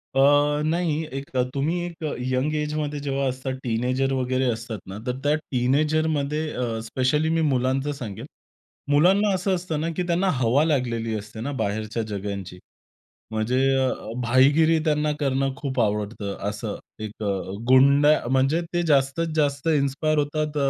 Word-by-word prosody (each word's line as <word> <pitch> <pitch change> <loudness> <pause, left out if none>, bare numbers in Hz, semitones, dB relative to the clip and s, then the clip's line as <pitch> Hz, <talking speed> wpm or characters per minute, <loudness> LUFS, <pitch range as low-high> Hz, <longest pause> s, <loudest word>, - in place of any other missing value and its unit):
अ, - - +3 0.5
नाही. 160 -1 0
एक 135 +1 -5 0.2
तुम्ही 155 +6 0
एक 170 -2 -8
अ, 150 - -1 0.2
यंग 135 +4 0
एजमध्ये 150 -1 -2
जेव्हा 140 -1 -1
असतात. 130 +1 -4
टीनेजर 125 +3 0
वगैरे 130 0 0
असतात 115 -2 -5
ना, 95 +2 -7
तर 125 +1 -1
त्या 145 +1 +3
टीनेजरमध्ये 150 +2 0
अ, 125 - -3 0.2
स्पेशली 130 +7 0
मी 165 0 +1
मुलांचं 135 +2 0
सांगेन. 115 -8 -7 0.7
मुलांना 190 +7 +4
असं 185 +1 0
असतं 165 -4 -3
ना, 165 - -1
की 180 - -1
त्यांना 180 +3 +1
हवा 125 +6 +3
लागलेली 115 -7 0
असते 105 +2 -9
ना 140 +4 -3
बाहेरच्या 110 +2 -2
जगाची. 100 -2 -5 0.7
म्हणजे 110 +4 0 0.2
अ, 130 -1 +2 0.3
भाईगिरी 145 +7 +4
त्यांना 150 -1 +1
करणं 135 -1 0
खूप 130 -4 -3
आवडतं. 105 -1 -1
असं 105 0 -4 0.3
एक 110 +1 -8
अ, 105 - -1 0.4
गुंडा 140 +3 +6
म्हणजे 135 +5 +2
ते 175 - +2
जास्तीत 145 +3 +2
जास्त 145 0 +1
इन्स्पायर 145 +2 0
होतात 150 +1 -1
135 Hz, 150 wpm, -24 LUFS, 125-155 Hz, 0.7 s, गुंडा